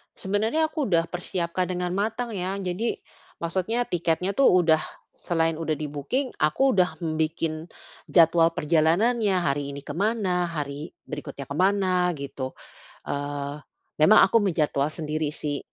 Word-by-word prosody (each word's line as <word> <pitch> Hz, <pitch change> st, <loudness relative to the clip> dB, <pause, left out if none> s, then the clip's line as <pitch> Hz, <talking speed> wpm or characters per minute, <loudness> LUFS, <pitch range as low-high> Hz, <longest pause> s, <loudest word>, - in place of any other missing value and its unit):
Sebenernya 220 Hz, +11 st, 0 dB
aku 310 Hz, -3 st, -2 dB
udah 165 Hz, -1 st, +3 dB
persiapkan 175 Hz, +1 st, -2 dB
dengan 180 Hz, 0 st, -2 dB
matang 225 Hz, +3 st, -2 dB
ya. 185 Hz, +1 st, -2 dB
Jadi 190 Hz, +5 st, -2 dB, 0.4 s
maksudnya 190 Hz, +8 st, -1 dB
tiketnya 175 Hz, +2 st, 0 dB
tu 275 Hz, -, +3 dB
udah 165 Hz, -3 st, +5 dB, 0.3 s
selain 165 Hz, -1 st, 0 dB
udah 155 Hz, -1 st, -2 dB
di-booking 150 Hz, -, -3 dB
aku 260 Hz, -, +3 dB
udah 180 Hz, -2 st, +2 dB
m 160 Hz, -1 st, -1 dB
bikin 160 Hz, 0 st, -2 dB, 0.4 s
jadwal 165 Hz, -1 st, +5 dB
perjalanannya, 180 Hz, +7 st, +2 dB
hari 140 Hz, -4 st, -1 dB
ini 140 Hz, -, -7 dB
kemana, 190 Hz, -3 st, 0 dB
hari 150 Hz, 0 st, -5 dB, 0.2 s
berikutnya 140 Hz, -2 st, -6 dB
ke 140 Hz, -, -5 dB
mana 185 Hz, 0 st, +2 dB
gitu. 135 Hz, -2 st, -5 dB, 0.6 s
Eee, 145 Hz, 0 st, -3 dB, 0.4 s
memang 155 Hz, +8 st, +7 dB
aku 230 Hz, -, +4 dB
menjadwal 150 Hz, -6 st, +1 dB
sendiri 155 Hz, -1 st, -2 dB
sih, 145 Hz, -2 st, -2 dB
170 Hz, 135 wpm, -25 LUFS, 155-195 Hz, 0.6 s, memang